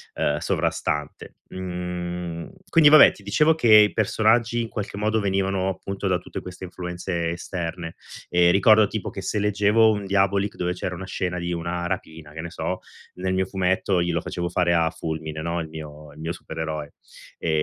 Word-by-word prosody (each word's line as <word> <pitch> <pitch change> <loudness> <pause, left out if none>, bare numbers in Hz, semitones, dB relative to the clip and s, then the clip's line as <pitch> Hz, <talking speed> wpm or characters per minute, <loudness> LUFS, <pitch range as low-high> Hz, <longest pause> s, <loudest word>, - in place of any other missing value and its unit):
ehm, 75 0 0
sovrastante. 75 0 -2 0.2
Mhmm, 90 -2 -5 0.2
quindi 160 -4 +6
vabbè, 150 -1 +8
ti 105 - -16
dicevo 150 +11 +3
che 120 -7 +1
i 105 -1 +7
personaggi 115 +2 +2
in 115 - -3
qualche 100 -2 -5
modo 110 +1 +1
venivano 95 -1 0
appunto 100 +1 -4
da 90 -1 +2
tutte 90 - -7
queste 90 +1 -8
influenze 90 -1 -4
esterne, 85 -1 -5 0.3
e 90 0 +4
ricordo 105 +3 +6
tipo 110 0 -4
che 95 - -7
se 100 +3 -2
leggevo 105 +2 +4
un 105 -2 -2
Diabolik 100 +1 +1
dove 90 -4 -1
c'era 90 0 -4
una 95 +2 -7
scena 90 -1 -3
di 85 0 -2
una 85 +1 -3
rapina, 80 -4 -6
che 80 - -6
ne 85 - -6
so, - - -3 0.4
nel 95 +1 -2
mio 95 0 +1
fumetto 95 0 0
io 85 0 0
lo 85 - 0
facevo 85 +1 -3
fare 85 0 +2
a 85 -1 +3
Fulmine, 80 -1 -5
no, 85 +1 -2
il 80 - -7
mio 75 -1 -9
il 75 - -15
mio 80 +2 -3
supereroe. 80 -3 -5 0.4
E - - -3
90 Hz, 185 wpm, -24 LUFS, 85-100 Hz, 0.4 s, vabbè